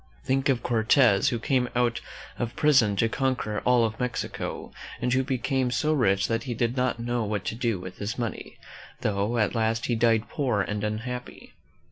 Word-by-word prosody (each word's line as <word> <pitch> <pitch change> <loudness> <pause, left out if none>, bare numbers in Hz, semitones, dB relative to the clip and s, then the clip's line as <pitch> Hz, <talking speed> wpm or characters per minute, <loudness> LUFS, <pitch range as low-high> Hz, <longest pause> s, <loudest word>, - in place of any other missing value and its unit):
Think 135 +2 +1
of 125 -3 +1
Cortez, 110 -2 +4
who 120 - -1
came 125 +2 0
out 120 -1 +1 0.4
of 120 0 -3
prison 130 -9 +4
to 115 - +2
conquer 125 -4 -1
all 125 -2 +3
of 110 0 -4
Mexico, 125 -1 -4 0.3
and 125 0 0
who 130 0 +2
became 130 -1 0
so 155 +5 +1
rich 100 -8 +2
that 115 +1 -1
he 120 -3 -3
did 120 +2 0
not 125 -2 0
know 120 0 -1
what 105 -2 -3
to - - -2
do 115 -4 -1
with 90 0 -9
his 105 +3 -3
money, 120 -2 -5 0.4
though 105 +3 0
at 105 -3 +1
last 115 0 0
he 120 - 0
died 115 -1 +2
poor 125 -8 0
and 105 +1 -3
unhappy! 115 +4 -5
120 Hz, 185 wpm, -26 LUFS, 110-125 Hz, 0.4 s, Cortez